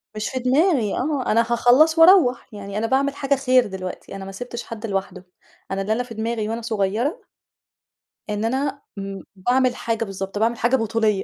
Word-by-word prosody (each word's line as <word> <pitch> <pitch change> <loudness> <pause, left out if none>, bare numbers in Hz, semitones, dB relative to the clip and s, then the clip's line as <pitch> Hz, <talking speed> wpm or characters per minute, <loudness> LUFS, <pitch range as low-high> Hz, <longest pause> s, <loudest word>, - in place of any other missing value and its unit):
مش 215 0 -3
في 260 - -3
دماغي 255 - +2
آه. 275 -1 -1
أنا 230 - +4
هاخلّص 245 +7 +4
وأروّح. 325 -8 +6
يعني 200 -1 -6
أنا 225 +1 0
باعمل 275 +3 +1
حاجة 280 0 +1
خير 255 -3 +3
دلوقتي، 190 0 -7
أنا 195 -1 -7
ما 195 - -7
سِبتش 240 +4 -6
حد 230 -1 -7
لوحده، 190 -2 -4 0.5
أنا 195 0 -1
ده 205 - -3
اللي - - +5
أنا 245 +3 -1
في - - -7
دماغي 220 -1 -2
وأنا 230 +1 -3
صغيرة 225 - -1 1.1
إن 210 +1 -2
أنا 270 +4 -1 0.2
م 195 -1 -6
باعمل 245 +6 +1
حاجة 230 -2 -2
بالضبط. 195 0 -6
باعمِل 230 +2 +1
حاجة 240 +4 +2
بطوليّة. 220 -4 0
230 Hz, 185 wpm, -22 LUFS, 205-260 Hz, 1.1 s, وأروّح